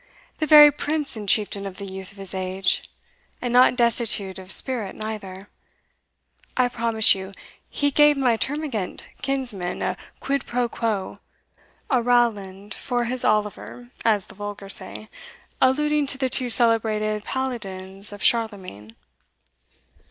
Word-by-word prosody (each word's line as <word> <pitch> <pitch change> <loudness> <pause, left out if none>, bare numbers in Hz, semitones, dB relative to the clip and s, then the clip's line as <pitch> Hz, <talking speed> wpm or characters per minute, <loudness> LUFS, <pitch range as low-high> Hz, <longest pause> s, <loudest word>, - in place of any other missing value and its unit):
the 310 - 0
very 295 0 +9
prince 300 0 -2
and 210 -3 -5
chieftain 200 -2 +2
of 190 - -9
the 200 - -7
youth 190 -1 -8
of 200 - -17
this 195 -1 -6
age; 185 0 0 0.5
and 245 -1 -3
not 250 0 +6
destitute 230 -5 +1
of 190 0 -10
spirit 235 -6 -1
neither 205 -3 -7 1.1
I 250 -1 +3
promise 230 -2 +3
you 190 0 -7 0.4
he 285 0 0
gave 295 +1 +5
my 250 -4 +2
termagant 265 -6 -3 0.2
kinsman 240 -10 -3
a - - -1 0.2
quid 280 0 -2
pro 245 0 0
quo 220 -5 -3 0.7
a 255 -3 +3
Rowland 210 -5 0
for 245 -2 -2
his 245 +1 -1
Oliver, 215 +3 -2
as 210 -4 +2
the - - -14
vulgar 205 -1 -7
say, 215 - -3 0.5
alluding 295 +2 +2
to 270 - -1
the 265 -1 -1
two 255 0 +1
celebrated 215 -3 +2
Paladins 200 -7 -4
of 205 - -8
Charlemagne." 190 - 0
220 Hz, 135 wpm, -23 LUFS, 195-255 Hz, 1.1 s, very